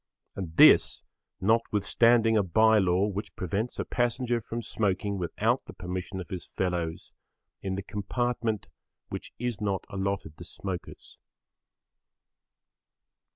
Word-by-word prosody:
And 85 -5 -6
this, - - +7 0.4
notwithstanding 115 +2 +3
a 105 - +5
bye 110 +4 +4
law 95 0 +3
which 105 -1 -4
prevents 100 +7 -2
a - - -2
passenger 120 0 0
from 115 +2 -5
smoking 100 -2 -1
without 85 -2 0
the - - -10
permission 90 +1 -5
of 90 - -7
his 95 -4 -5
fellows 85 -3 -3 0.5
in 95 -1 -2
the 100 - -4
compartment 110 +2 -2 0.4
which - - -6
is 120 -3 -3
not 100 -2 -1
allotted 100 -5 -3
to - - -7
smokers. 95 -3 -7
100 Hz, 120 wpm, -28 LUFS, 95-115 Hz, 0.5 s, this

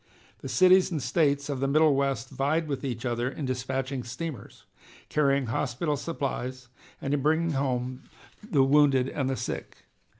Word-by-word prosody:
The - - -7
cities 185 0 +5
and 165 -4 -2
States 140 +2 +1
of 140 -3 -3
the 135 - 0
Middle 155 +1 +4
West 135 -2 -1
vied 145 +5 0
with 140 -2 -3
each 125 -2 -4
other 120 0 -1
in 140 +1 -5
dispatching 130 +1 -2
steamers, 130 -1 -7 0.5
carrying 140 -2 +2
hospital 135 +6 -1
supplies 130 -4 -4 0.3
and 135 - -2
in 145 - +1
bringing 160 +3 +2
home 130 -2 -2 0.4
the 140 -4 +4
wounded 135 -2 +4
and 135 -2 -2
sick. - - -6
135 Hz, 155 wpm, -27 LUFS, 130-150 Hz, 0.5 s, cities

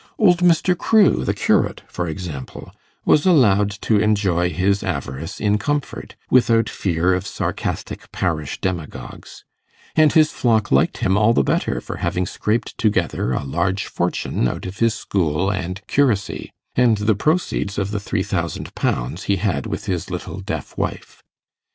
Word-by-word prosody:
Old 180 -6 +4
Mr. 180 +1 +3
Crewe, 210 - +3
the - - 0
curate, - - +1
for 90 - -4
example, 80 -6 -7 0.3
was 150 +5 +4
allowed 105 - +4
to 110 -2 +2
enjoy 100 -5 +2
his 100 +2 +1
avarice 65 +6 -4
in 105 0 +1
comfort, 145 +2 -3 0.2
without 115 -3 +4
fear 90 0 0
of 90 - -2
sarcastic - - -4
parish 80 -6 -2
demagogues; 90 -5 -5 0.5
and 155 -1 +5
his 155 -1 +5
flock 110 -3 +1
liked 65 - +3
him 95 +2 +3
all 110 +2 +4
the 70 - +3
better - - 0
for - - -7
having 90 0 -1
scraped 110 +4 -2
together 95 - 0
a 65 - -1
large 85 +7 -1
fortune - - -1
out - - -4
of 95 +1 -7
his 115 -1 +2
school 90 0 0
and 95 +1 -4
curacy, 120 -8 0 0.2
and 120 -3 +3
the 105 +2 +2
proceeds 130 - 0
of 100 0 -1
the 105 - -1
three 100 - -2
thousand - - -3
pounds 65 +10 -2
he 100 - +2
had 100 +3 -1
with 105 -1 -4
his 90 -5 -2
little - - -5
deaf - - -5
wife. - - -4
100 Hz, 155 wpm, -21 LUFS, 90-115 Hz, 0.5 s, and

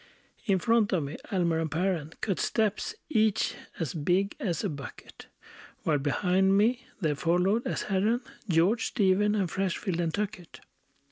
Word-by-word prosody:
In 195 -2 +4
front 225 +1 +2
of 170 -5 +1
me 140 +2 -5
Almer 170 -4 +1
and 160 -1 -1
Perren 165 -1 -1
Cut 195 -4 -1
steps, 220 - 0
each 220 -7 +2 0.3
as 160 -7 -2
big 180 +6 +1
as 175 -7 -2
a - - +1
bucket; 140 -3 -9 0.6
While 150 -3 +2
behind 190 +7 +2
me 240 +5 +2
there 155 -6 +1
followed, 180 - +1
as - - -2
Herren, 210 +5 +1 0.3
George, 185 +8 +3
Stephen, 205 -1 +2
and 195 -3 +1
Freshfield, 190 0 -2
and 170 -2 0
Tuckett. 205 -2 -5
190 Hz, 150 wpm, -28 LUFS, 165-210 Hz, 0.6 s, In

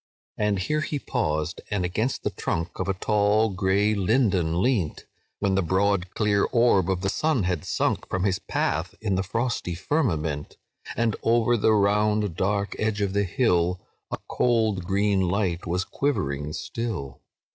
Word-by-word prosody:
"And 105 -1 +1
here 150 +12 0
he 155 -1 -2
paused, 75 - -2
and 100 -4 0
against 110 +9 -1
the - - -1
trunk 85 +1 -3
Of 95 - -1
a 100 - 0
tall 105 +2 +2
grey 100 +2 +2
linden 95 -5 +2
leant, 95 - 0 0.3
When 100 -1 0
the 95 - +2
broad 95 +1 0
clear 105 -2 +2
orb 115 -6 +3
of 95 -1 0
the 95 - -1
sun 150 0 +1
had 90 -4 -1
sunk - - 0
From 95 -1 -1
his 95 -2 +1
path 80 +5 -2
in 105 -3 -1
the 95 - +1
frosty 105 -2 -2
firmament, 80 - -1 0.4
And 115 -2 +1
over 120 +1 +3
the 110 0 +3
round 105 -2 +2
dark 100 +2 -1
edge 110 -1 0
of 100 -1 0
the 100 0 +2
hill 90 -5 +1 0.3
A - - -3
cold 110 -6 +1
green 100 +1 +2
light 90 -1 0
was 90 +2 -1
quivering 75 - -2
still. 90 - -5
100 Hz, 160 wpm, -25 LUFS, 90-110 Hz, 0.4 s, orb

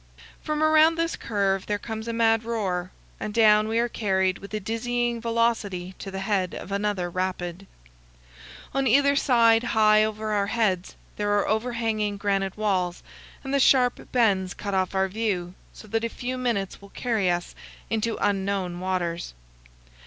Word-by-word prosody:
From 305 0 -1
around 310 +1 +5
this 330 0 -1
curve 195 -3 -1
there 210 - 0
comes 220 +1 -6
a - - -1
mad 225 -1 +2
roar, 190 -6 -2 0.3
and 215 - -4
down 215 -1 +5
we 225 +1 -1
are 235 +1 +2
carried 190 -5 0
with 200 - -11
a 215 - -2
dizzying 235 +3 -2
velocity 225 -6 -1
to 195 - -6
the 190 0 -5
head 195 -2 -1
of 195 - -8
another 200 -2 -1
rapid. 185 +1 -4 1.1
On 270 0 +1
either 280 +4 +4
side 230 -5 +4
high 215 -3 +4
over 215 0 -2
our 200 -1 +1
heads 200 -5 0 0.2
there 205 0 +1
are 205 - +1
overhanging 220 -2 -1
granite 195 -1 -1
walls, 185 -4 -1 0.4
and 270 0 -4
the 280 - +3
sharp 250 -2 +3
bends 195 -7 +2
cut 200 -1 -5
off 190 0 0
our 190 0 +2
view, 190 -4 -2 0.2
so 215 - -13
that 225 +2 -1
a 230 - 0
few 255 +2 -4
minutes 235 -8 -2
will 200 - -13
carry 220 -4 0
us 175 0 -2 0.4
into 225 0 0
unknown 195 -3 -1
waters. 175 - -3
210 Hz, 165 wpm, -25 LUFS, 190-230 Hz, 1.1 s, around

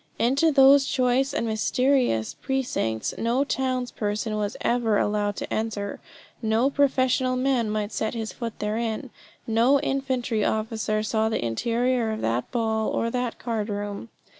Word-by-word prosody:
Into 275 +8 +3
those 275 0 +6
choice 255 +1 +1
and 235 - -1
mysterious 230 - +1
precincts 245 - -2
no 235 +4 +1
towns 255 -3 -1
person 210 +1 -2
was 210 0 -2
ever 235 -3 +2
allowed 205 0 0
to - - -5
enter; 210 -2 -3 0.4
no 225 +4 +2
professional 260 -2 +2
man 255 -3 +1
might 210 0 -2
set 220 +2 -2
his 220 -1 -4
foot 230 -2 -6
therein; 225 +4 -2 0.3
no 235 +5 +3
infantry 260 -6 -1
officer 215 -1 -1
saw 220 0 +1
the 220 - -1
interior 235 - 0
of 220 0 -3
that 115 +2 -1
ball, 220 -2 0
or 230 - -1
that 245 -1 -2
card 225 -3 -3
room. 205 +2 -4
230 Hz, 145 wpm, -25 LUFS, 215-255 Hz, 0.4 s, those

